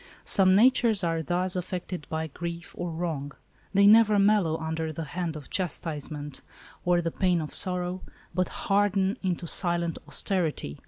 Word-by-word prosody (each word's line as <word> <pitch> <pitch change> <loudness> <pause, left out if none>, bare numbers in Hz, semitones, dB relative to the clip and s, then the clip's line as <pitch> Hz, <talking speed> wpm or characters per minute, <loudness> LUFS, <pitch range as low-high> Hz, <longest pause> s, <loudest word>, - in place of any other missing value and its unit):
Some 190 -1 +5
natures 230 -2 +4
are 165 -1 0
thus 180 +4 -1
affected 180 -3 -5
by 160 0 -2
grief 170 +2 -7
or 175 - -4
wrong. 160 -4 -4 0.4
They 200 0 +4
never 215 0 +6
mellow 200 -5 +3
under 160 0 -3
the 160 +1 -5
hand 165 +1 -4
of 150 -3 -10
chastise 160 -4 -3
ment 150 -2 -7 0.4
or 175 -1 +2
the 165 - -1
pain 180 -1 +1
of 155 -2 -5
sorrow, 180 0 -1 0.3
but 180 0 0
harden 200 +1 0
into 180 -3 -2
silent 170 -1 +1
austerity. 160 - 0
175 Hz, 155 wpm, -27 LUFS, 160-190 Hz, 0.4 s, never